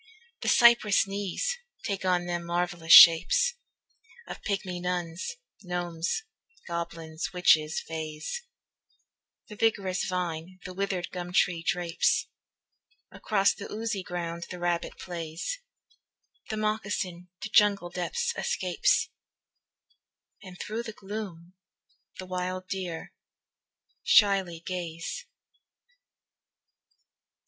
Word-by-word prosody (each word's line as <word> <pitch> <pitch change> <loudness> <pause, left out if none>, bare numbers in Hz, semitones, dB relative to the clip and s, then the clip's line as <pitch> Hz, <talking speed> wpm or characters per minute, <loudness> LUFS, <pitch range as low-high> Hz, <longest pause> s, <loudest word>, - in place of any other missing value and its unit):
The - - -4
cypress 235 -4 +6
knees 200 - -2 0.3
take 200 -2 -2
on 180 -1 +2
them 175 -1 -2
marvellous 170 -1 -2
shapes 180 - +9 0.7
Of - - -8
pygmy 190 -3 -3
nuns, 180 - -3 0.3
gnomes, 175 - -2 0.4
goblins, 165 -2 -4
witches, 160 -3 +4
fays, 160 - -5 1.1
The 210 - -10
vigorous 200 -4 +1
vine 180 -1 -3
the 185 - -6
withered 190 -2 -2
gum 180 -1 -6
tree 180 -2 +2
drapes, 170 0 +1 0.9
Across 200 -2 +2
the 200 - -9
oozy 215 -2 -2
ground 170 -1 -5
the 180 - -6
rabbit 175 -1 -2
plays, 170 - -5 0.9
The 220 - -2
moccasin 205 -4 -2
to 210 - -5
jungle 200 -5 +4
depths 475 - -2
escapes, 485 0 +1 1.3
And 185 -2 -11
through 220 +2 -3
the 225 -2 -7
gloom 195 -5 -7 0.6
the 185 - -6
wild 185 0 -3
deer 180 -4 -5 0.9
shyly 195 -5 +4
gaze. 175 - -5
180 Hz, 100 wpm, -28 LUFS, 170-200 Hz, 1.3 s, shapes